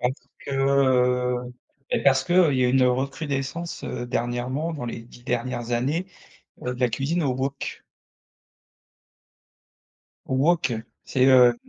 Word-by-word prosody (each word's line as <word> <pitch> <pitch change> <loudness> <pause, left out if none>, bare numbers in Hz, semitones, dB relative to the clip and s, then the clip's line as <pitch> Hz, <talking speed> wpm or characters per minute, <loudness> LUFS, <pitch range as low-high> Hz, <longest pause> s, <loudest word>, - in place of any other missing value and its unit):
parce 125 +1 +1 0.3
que, - - -8
heu. 125 -2 +2 0.4
Bah, - - +2
parce 135 -1 +4
qu'il 175 - 0 0.2
y 130 -1 +2
a - - +3
une 130 +1 +4
recrudescence, 135 +5 -2
heu, 120 - -4
dernièrement 120 +7 -2
dans 145 -6 -5
les 115 -1 -5
10 120 +1 -16
dernières 120 -1 -2
années, 140 +10 0 0.6
heu, 125 - -1
de - - -12
la 125 -1 +3
cuisine 145 +9 -1
au 135 -3 +1
wok. 135 +2 -4 2.4
Au 130 - -1
wok. 155 -1 +2 0.3
C'est, 130 -1 +2
heu, 125 -2 +7
130 Hz, 140 wpm, -24 LUFS, 125-140 Hz, 2.4 s, heu